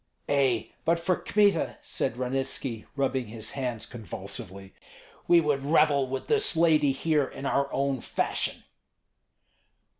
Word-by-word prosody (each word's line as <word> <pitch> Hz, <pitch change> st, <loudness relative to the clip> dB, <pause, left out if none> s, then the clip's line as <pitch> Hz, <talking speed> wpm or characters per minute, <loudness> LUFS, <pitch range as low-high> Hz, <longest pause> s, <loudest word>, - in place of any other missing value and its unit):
"Ei! 130 Hz, -6 st, +1 dB
but 170 Hz, +1 st, +2 dB
for 175 Hz, +2 st, +1 dB
Kmita," 205 Hz, +1 st, +2 dB
said 115 Hz, -, -2 dB
Ranitski, 130 Hz, -2 st, -3 dB
rubbing 135 Hz, -3 st, 0 dB
his 110 Hz, 0 st, -7 dB
hands 125 Hz, -5 st, -3 dB
convulsively, 100 Hz, -4 st, -8 dB, 0.5 s
"we 175 Hz, -, +7 dB
would 150 Hz, -4 st, +1 dB
revel 145 Hz, -2 st, +3 dB
with 135 Hz, +1 st, -4 dB
this 425 Hz, -, +3 dB
lady 155 Hz, -4 st, +4 dB
here 150 Hz, +1 st, +1 dB
in 135 Hz, -, -8 dB
our 140 Hz, 0 st, +1 dB
own 135 Hz, -2 st, 0 dB
fashion." -, -, -2 dB
135 Hz, 125 wpm, -27 LUFS, 125-155 Hz, 0.5 s, we